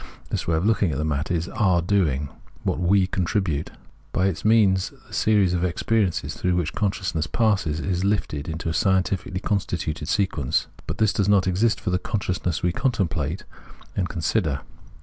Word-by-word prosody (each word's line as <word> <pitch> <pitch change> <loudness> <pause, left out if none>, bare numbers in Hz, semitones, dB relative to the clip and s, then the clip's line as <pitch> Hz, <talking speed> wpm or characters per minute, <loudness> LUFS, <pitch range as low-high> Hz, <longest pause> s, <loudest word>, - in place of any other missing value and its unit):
This - - -2
way 80 - +2
of 85 - 0
looking 105 -5 +2
at 70 - -2
the 75 - -1
matter 75 0 -1
is 85 0 -2
our 95 -5 +2
doing, 80 -7 +1 0.3
what - - -1
we 95 +2 +4
contribute; 90 -4 -1 0.4
by 95 - +1
its 95 -4 -1
means 105 -4 +4 0.2
the - - -16
series 105 -4 +3
of 90 -1 0
ex 90 -2 -2
periences 110 -6 +1
through 90 -1 0
which 85 -3 -1
consciousness 95 -6 -1
passes, 100 -7 +1
is 90 +1 -1
lifted 90 -7 -1
into 80 +1 -4
a 80 - 0
scientifically 95 0 +1
constituted 80 -7 -2
sequence, 90 -9 +1 0.2
but 80 - -3
this 110 -2 +3
does 100 -1 +1
not 100 -2 +4
exist 100 +4 +2
for 100 - -2
the 90 - +1
consciousness 95 -6 -2
we 90 - +2
contemplate 90 - -1 0.5
and 90 -3 -1
con 85 - -5
sider. 80 - +1
90 Hz, 180 wpm, -24 LUFS, 80-100 Hz, 0.5 s, we